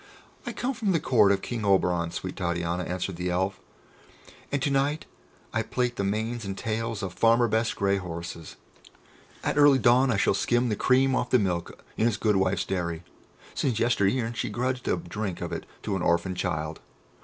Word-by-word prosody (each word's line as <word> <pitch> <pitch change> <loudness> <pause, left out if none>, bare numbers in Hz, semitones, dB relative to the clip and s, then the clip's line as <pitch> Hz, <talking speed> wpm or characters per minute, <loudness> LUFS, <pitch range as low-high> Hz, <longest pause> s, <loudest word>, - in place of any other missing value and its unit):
"I - - -1
come 260 +2 -2
from 215 -5 0
the 165 - +2
court 120 -8 +4
of 100 -1 0
King 120 -3 -4
Oberon, 90 -4 +2
sweet 90 +2 -5
Titania," 85 -1 -1
answered 90 0 -3
the 90 +1 -2
Elf, 95 +2 -1 0.9
"and 140 - +1
to 145 - +1
night 140 +3 +1 0.5
I 110 - +1
plait 120 +2 -1
the 100 - -2
manes 110 +4 -2
and 95 -1 -5
tails 110 -1 -3
of 95 -2 -4
Farmer 115 +3 +4
Best's 110 +1 0
grey 100 -1 +1
horses. 85 -3 -7 0.9
At - - 0
early 145 -2 +7
dawn 130 +2 +4
I 115 - +2
shall 100 - +3
skim 120 +4 +1
the 105 - 0
cream 130 +5 +3
off - - -1
the 125 - +5
milk 90 -6 -2
in 115 - +3
his 115 -3 0
good 105 -2 +2
wife's 95 -1 +1
dairy, 85 -3 -3 0.5
since 125 -6 0
yester 115 -4 +2
e'en 115 +1 0
she - - -3
grudged 125 +1 -2
a - - +2
drink 105 - -4
of 90 -3 -4
it - - -5 0.2
to 100 - -1
an 95 - -2
orphan 85 +2 +1
child. 80 -4 -3
105 Hz, 195 wpm, -27 LUFS, 90-120 Hz, 0.9 s, early